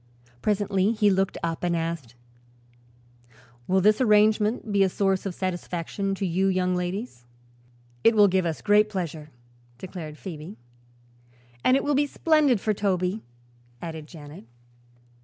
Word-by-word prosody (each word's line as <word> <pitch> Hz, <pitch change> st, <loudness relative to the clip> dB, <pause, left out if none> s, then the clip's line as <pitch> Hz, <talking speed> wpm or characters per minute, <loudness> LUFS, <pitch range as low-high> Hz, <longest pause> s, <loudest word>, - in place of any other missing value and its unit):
Presently 205 Hz, 0 st, +1 dB
he 210 Hz, -2 st, +3 dB
looked 195 Hz, 0 st, 0 dB
up 165 Hz, 0 st, -3 dB
and 175 Hz, -1 st, +1 dB
asked: 165 Hz, -7 st, -4 dB, 1.5 s
"Will 190 Hz, +1 st, +2 dB
this 210 Hz, +5 st, +4 dB
arrangement 215 Hz, 0 st, +3 dB
be 200 Hz, -1 st, +2 dB
a 195 Hz, -, +4 dB
source 195 Hz, 0 st, 0 dB
of 180 Hz, -, -5 dB
satisfaction 185 Hz, +1 st, -3 dB
to 195 Hz, -, -3 dB
you 185 Hz, +2 st, +1 dB
young 185 Hz, -1 st, +1 dB
ladies?" 180 Hz, -, -4 dB, 0.8 s
"It 230 Hz, -, +5 dB
will 205 Hz, -1 st, +7 dB
give 190 Hz, -1 st, +1 dB
us 160 Hz, -, -4 dB
great 210 Hz, 0 st, +4 dB
pleasure," 165 Hz, -6 st, -5 dB, 0.5 s
declared 165 Hz, -4 st, -8 dB
Phoebe. 170 Hz, +2 st, -8 dB, 1.1 s
"And 255 Hz, -, +4 dB
it -, -, -2 dB
will 290 Hz, -, +1 dB
be 290 Hz, +1 st, +2 dB
splendid 295 Hz, -6 st, +2 dB
for 215 Hz, +2 st, 0 dB
Toby," 190 Hz, 0 st, -1 dB, 0.6 s
added 160 Hz, -1 st, -7 dB
Janet. 150 Hz, -6 st, -12 dB
190 Hz, 140 wpm, -25 LUFS, 170-210 Hz, 1.5 s, will